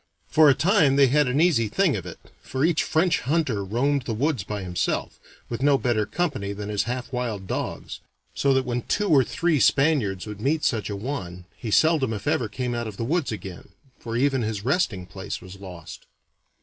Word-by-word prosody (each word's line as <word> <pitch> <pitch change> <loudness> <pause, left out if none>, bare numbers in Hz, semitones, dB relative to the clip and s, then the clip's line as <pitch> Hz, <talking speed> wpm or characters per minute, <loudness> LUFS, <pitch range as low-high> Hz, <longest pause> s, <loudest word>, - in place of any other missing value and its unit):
For 155 -1 +6
a 135 - +5
time 155 -3 +3
they 140 -2 +5
had 145 +1 +3
an 125 +3 +1
easy 155 -10 +3
thing 170 - +1
of 90 -3 -5
it, 85 - -8 0.2
for 130 +3 -1
each 165 -2 +2
French 165 +1 +2
hunter 135 -8 0
roamed 135 +8 0
the 115 - -2
woods 140 -2 0
by 105 0 -5
himself, 90 -2 -2 0.3
with 120 +1 -5
no 140 0 +4
better 115 -5 0
company 145 - -2
than 105 +1 -6
his 105 0 0
half 125 +2 -4
wild 115 -6 -3
dogs, - - -4 0.3
so 140 - +1
that 130 0 +1
when 125 0 -2
two 205 - -1
or 140 -5 +6
three 165 +3 0
Spaniards 130 -11 +2
would 105 -1 -8
meet 150 +5 0
such 110 -4 0
a 100 - -3
one, 95 -6 -5
he 115 - -6
seldom 145 -1 +3
if 100 -2 -6
ever 120 - +1
came 125 +2 -3
out 120 -1 -3
of 105 -3 -8
the - - -3
woods 160 +1 0
again, 95 -4 -8 0.3
for 115 0 -4
even 135 0 +2
his 110 -2 -3
resting 125 - 0
place 95 +2 -6
was 95 +1 -12
lost. 90 -5 -10
125 Hz, 205 wpm, -24 LUFS, 105-145 Hz, 0.3 s, For